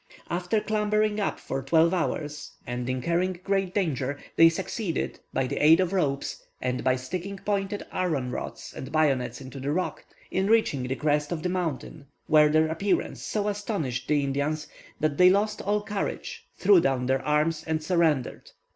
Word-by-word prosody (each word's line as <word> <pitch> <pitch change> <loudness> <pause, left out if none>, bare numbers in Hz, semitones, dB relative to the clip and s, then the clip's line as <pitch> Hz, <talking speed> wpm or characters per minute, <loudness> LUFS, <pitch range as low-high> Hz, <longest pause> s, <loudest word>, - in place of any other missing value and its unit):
After 180 +5 0
clambering 210 0 +1
up 200 - -1
for 135 - -4
twelve 160 +5 +3
hours, 150 -4 -3
and 125 0 -4
incurring 170 +7 0
great 195 -2 0
danger, 145 -8 0 0.2
they 165 0 +8
succeeded, 190 +1 -3
by 135 - 0
the 140 +2 -3
aid 160 +3 +7
of 185 0 +1
ropes, 140 -7 -1 0.2
and 125 0 -2
by 130 -1 +3
sticking 180 +10 -5
pointed 200 0 -2
iron 150 -9 -1
rods - - -6
and 130 - -7
bayonets 140 -5 +1
into 135 +1 -8
the 140 +2 -2
rock, 180 +4 -2 0.3
in 190 +1 +1
reaching 220 - +3
the 130 - -1
crest 150 0 0
of 160 -3 -3
the 180 - 0
mountain, 160 -5 -3 0.2
where 150 -1 +5
their 155 +1 +3
appearance 175 +5 -1
so 210 -1 -2
astonished 200 - -2
the 145 -1 +2
Indians, 145 +3 -1 0.3
that 150 -2 0
they 180 0 +8
lost 210 +2 +1
all 205 +1 0
courage, 205 -1 -4
threw 195 -2 +6
down 135 -4 +1
their 130 +1 +1
arms, 150 +1 +1
and 160 -1 -1
surrendered. 160 -6 +1
160 Hz, 170 wpm, -27 LUFS, 140-190 Hz, 0.3 s, they